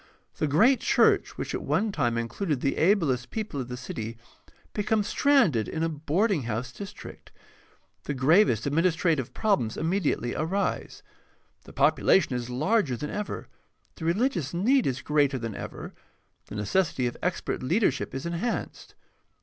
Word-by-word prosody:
The 155 - 0
great 225 - +4
church - - +3
which - - -4
at - - -2
one 215 +1 0
time 120 -10 0
included 140 - -2
the 135 - 0
ablest 155 - +2
people 210 -11 -4
of 125 - -6
the 125 0 -6
city 115 -2 -6 0.6
becomes 210 0 0
stranded 230 - +3
in 160 - -3
a 165 - +1
boarding 160 +5 0
house 120 +3 -3
district. 200 +10 -10 0.7
The 145 - -3
gravest 135 - +4
administrative 160 -2 +1
problems 195 - 0
immediately 160 -7 0
arise. 190 +6 -2 0.6
The - - -13
population 170 -8 +3
is 120 0 -4
larger 150 - +1
than 150 +5 -5
ever, 210 0 -4 0.5
the 160 - -8
religious 175 - 0
need 250 +9 +3
is 135 -1 -2
greater 145 -2 +2
than 115 -3 -4
ever, - - -7 0.5
the - - -8
necessity 130 - 0
of 120 - -2
expert 180 - -2
leadership 155 - 0
is 135 - -4
enhanced. 170 +8 -4
155 Hz, 145 wpm, -27 LUFS, 125-200 Hz, 0.7 s, great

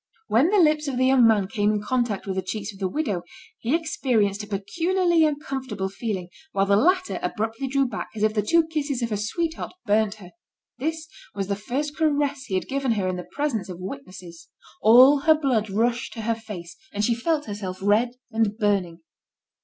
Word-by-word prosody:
When 255 +10 +4
the 420 - +3
lips 305 -4 +3
of 265 -3 -2
the 255 - +3
young 260 -3 +6
man 210 -4 +3
came 205 +1 0
in 210 - 0
contact 235 -2 -1
with 190 -2 -3
the 190 - 0
cheeks 200 +2 -5
of 195 - -15
the 190 - 0
widow, 205 - -2 0.4
he 245 +7 +1
experienced 235 -11 0
a 210 - -8
peculiarly 335 - +1
uncomfortable 265 -9 -3
feeling, 195 -3 -4 0.2
while 195 0 +2
the 200 0 +3
latter 365 - +2
abruptly 225 +4 -2
drew 275 0 +1
back, - - -5
as 215 - -2
if 215 0 +3
the 215 - +1
two 330 +10 +3
kisses 290 -5 -2
of 230 - -2
her - - +1
sweetheart 320 - -3
burnt 215 -1 +2
her. 185 -4 -13 0.5
This 320 +3 -3 0.3
was 195 -1 -3
the 200 - +1
first 275 +9 -3
caress 290 -3 0
he 190 - -3
had 185 - -1
given 270 -3 0
her 200 -4 -1
in 185 - -1
the 180 - -7
presence 275 -10 -2
of 180 - -6
witnesses. 185 -6 -9 0.3
All 255 +6 +7
her 315 +2 +5
blood 250 -8 0
rushed 235 +4 0
to 225 - -6
her 230 +1 0
face, 210 -7 -8 0.2
and 205 +1 0
she 235 - +2
felt 295 +6 0
herself 200 -3 -5
red 215 +5 +2 0.2
and 220 -2 0
burning. 195 -6 0
225 Hz, 200 wpm, -24 LUFS, 200-285 Hz, 0.5 s, All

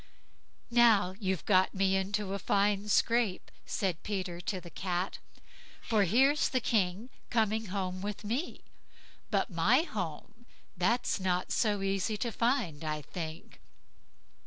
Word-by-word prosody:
"Now, 225 -6 +5
you've 190 -5 -2
got 190 -1 +3
me 195 0 +2
into 195 +1 -1
a 200 - -2
fine 205 +1 +1
scrape", 230 -2 +1 0.2
said 185 -5 -1
Peter 185 -4 -4
to 190 +1 -3
the 175 -1 -12
Cat, 185 0 -3 0.6
"for 215 -3 +2
here's 270 - +3
the 255 - +1
King 215 +1 0 0.2
coming 220 -1 +1
home 185 -1 -3
with 205 +1 -5
me; 240 +11 -3 0.7
but - - 0
my 205 - +3
home, 210 - -6 0.3
that's 210 +6 +1
not 180 -1 -1
so 205 -3 +1
easy 195 +2 0
to 235 +2 -2
find, 230 - 0
I 155 -1 -3
think." 160 +3 -7
195 Hz, 135 wpm, -31 LUFS, 185-225 Hz, 0.7 s, Now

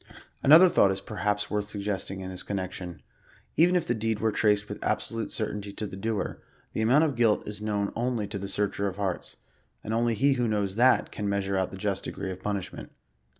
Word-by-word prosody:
Another 160 +6 +9
thought 100 - +4
is 95 - -1
perhaps 105 0 -2
worth 105 -1 0
suggesting 100 -2 -3
in 95 0 -5
this 90 0 -2
con 100 - -3
nection. 90 -2 -6 0.5
Even 175 +3 +5
if 175 -2 +2
the 120 - +1
deed 110 -1 -1
were 110 0 +1
traced 105 -1 +2
with - - -7
absolute 115 -1 -1
certainty 105 -2 -3
to 110 - -4
the 95 - -7
doer, 110 +2 -3 0.3
the - - -1
amount 130 +8 +5
qf - - +2
his 135 - -6
guilt 115 -3 +2
is 105 0 -6
known 105 -1 -1
only 120 -2 -1
to 100 0 -5
the 100 - -5
Searcher 100 0 0
of 95 0 -5
hearts; 95 -3 -3 0.5
and 110 - -3
only 115 0 +2
he 140 +5 +3
who 125 -2 0
knows 100 -3 0
that, 125 +3 +4
can 105 -1 -3
measure 100 -1 0
out 95 -1 +1
the 95 - -8
just 100 0 -2
degree 95 - -4
of 95 0 -8
punishment. 100 -2 -4
105 Hz, 220 wpm, -28 LUFS, 100-115 Hz, 0.5 s, Another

